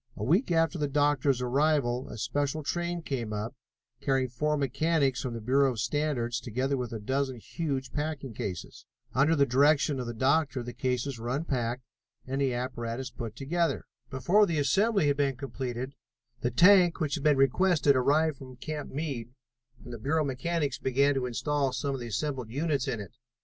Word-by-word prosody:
A -, -, -5 dB
week 175 Hz, -, +2 dB
after 165 Hz, +1 st, +2 dB
the 145 Hz, -, +1 dB
doctor's 140 Hz, -2 st, +2 dB
arrival, 130 Hz, -1 st, +1 dB
a -, -, -7 dB
special 145 Hz, +6 st, -1 dB
train 175 Hz, +2 st, -2 dB
came 120 Hz, -7 st, -3 dB
up, 105 Hz, +3 st, -3 dB, 0.5 s
carrying 135 Hz, -2 st, +1 dB
four 150 Hz, +5 st, 0 dB
mechanics 140 Hz, 0 st, +1 dB
from 125 Hz, -3 st, -4 dB
the -, -, -4 dB
Bureau 135 Hz, +3 st, +3 dB
of 115 Hz, -, -7 dB
Standards, 120 Hz, -2 st, -1 dB
together 130 Hz, +4 st, -1 dB
with 125 Hz, -3 st, -3 dB
a 115 Hz, -, -3 dB
dozen 130 Hz, +4 st, -1 dB
huge 135 Hz, +1 st, -4 dB
packing 145 Hz, -4 st, -3 dB
cases. 95 Hz, -4 st, -6 dB, 0.3 s
Under 145 Hz, +5 st, +4 dB
the 140 Hz, -2 st, +4 dB
direction 140 Hz, +2 st, +3 dB
of 125 Hz, -, -4 dB
the 120 Hz, -, -5 dB
doctor 140 Hz, +1 st, +1 dB
the 120 Hz, +1 st, -7 dB
cases 125 Hz, +1 st, -2 dB
were 120 Hz, +1 st, -4 dB
unpacked 125 Hz, -3 st, -1 dB, 0.4 s
and 135 Hz, +2 st, -2 dB
the 135 Hz, -2 st, +2 dB
apparatus 120 Hz, 0 st, -4 dB
put 115 Hz, -3 st, -6 dB
together. 165 Hz, +6 st, -1 dB, 0.2 s
Before 180 Hz, +11 st, +3 dB
the 165 Hz, -3 st, -1 dB
assembly 195 Hz, -, +2 dB
had 145 Hz, -1 st, +2 dB
been 140 Hz, -2 st, +1 dB
completed 130 Hz, -1 st, -5 dB, 0.5 s
the 120 Hz, -, 0 dB
tank 175 Hz, +7 st, +6 dB
which 155 Hz, -4 st, -1 dB
had 150 Hz, -, -2 dB
been 150 Hz, -2 st, +4 dB
requested 145 Hz, +1 st, +4 dB
arrived 145 Hz, +4 st, +2 dB
from 130 Hz, -1 st, -11 dB
Camp 150 Hz, +3 st, -5 dB
Meade, 130 Hz, -5 st, -4 dB, 0.5 s
and 120 Hz, -, -9 dB
the 115 Hz, -, -6 dB
Bureau 155 Hz, +7 st, +1 dB
mechanics 145 Hz, +1 st, -1 dB
began 140 Hz, +2 st, +2 dB
to 130 Hz, -2 st, -1 dB
install 135 Hz, +3 st, 0 dB
some 140 Hz, +1 st, -2 dB
of 135 Hz, -, -4 dB
the 120 Hz, -, -6 dB
assembled 130 Hz, 0 st, -3 dB
units 140 Hz, +1 st, -1 dB
in 115 Hz, -, -2 dB
it. 105 Hz, +1 st, -8 dB
135 Hz, 180 wpm, -29 LUFS, 125-150 Hz, 0.5 s, tank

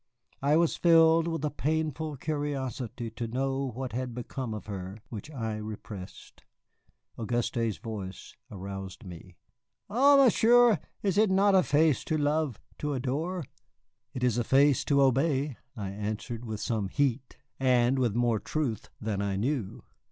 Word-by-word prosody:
I 145 Hz, +3 st, +3 dB
was 170 Hz, -1 st, +2 dB
filled 165 Hz, -1 st, +5 dB
with 165 Hz, -3 st, -2 dB
a 150 Hz, -, -1 dB
painful 155 Hz, 0 st, -2 dB
curiosity 130 Hz, -5 st, -3 dB
to 115 Hz, +1 st, -4 dB
know 135 Hz, +3 st, -1 dB
what 125 Hz, +1 st, -5 dB
had 125 Hz, -1 st, -3 dB
become 125 Hz, 0 st, -5 dB
of 105 Hz, -1 st, -6 dB
her, 95 Hz, -1 st, -6 dB
which 110 Hz, +5 st, -7 dB
I 115 Hz, -7 st, -3 dB
repressed. 105 Hz, -3 st, -9 dB, 0.8 s
Auguste's 115 Hz, -1 st, -1 dB
voice 100 Hz, -5 st, -7 dB
aroused 95 Hz, +1 st, -7 dB
me. 90 Hz, 0 st, -11 dB, 0.6 s
"Ah, 275 Hz, +6 st, +6 dB
Monsieur, 240 Hz, -, +6 dB, 0.2 s
is 200 Hz, -1 st, +2 dB
it 215 Hz, -1 st, +4 dB
not 195 Hz, +1 st, +4 dB
a 190 Hz, -, +6 dB
face 150 Hz, -2 st, +2 dB
to 155 Hz, -, 0 dB
love, 150 Hz, -4 st, 0 dB, 0.2 s
to 150 Hz, -1 st, -2 dB
adore?" 155 Hz, +8 st, -2 dB, 0.7 s
"It 125 Hz, -, -3 dB
is 120 Hz, -2 st, +2 dB
a -, -, +1 dB
face 140 Hz, +2 st, +4 dB
to 140 Hz, -2 st, +4 dB
obey," 135 Hz, 0 st, +1 dB, 0.2 s
I 100 Hz, -3 st, -4 dB
answered, 110 Hz, +4 st, -4 dB
with 110 Hz, -2 st, -5 dB
some 110 Hz, -4 st, -1 dB
heat, 135 Hz, +2 st, -1 dB, 0.2 s
and 130 Hz, 0 st, +3 dB
with 120 Hz, -5 st, +1 dB
more 120 Hz, -2 st, +2 dB
truth 135 Hz, -6 st, -3 dB
than 105 Hz, -2 st, -2 dB
I 100 Hz, -1 st, -1 dB
knew. 115 Hz, 0 st, -2 dB
130 Hz, 150 wpm, -29 LUFS, 110-155 Hz, 0.8 s, Ah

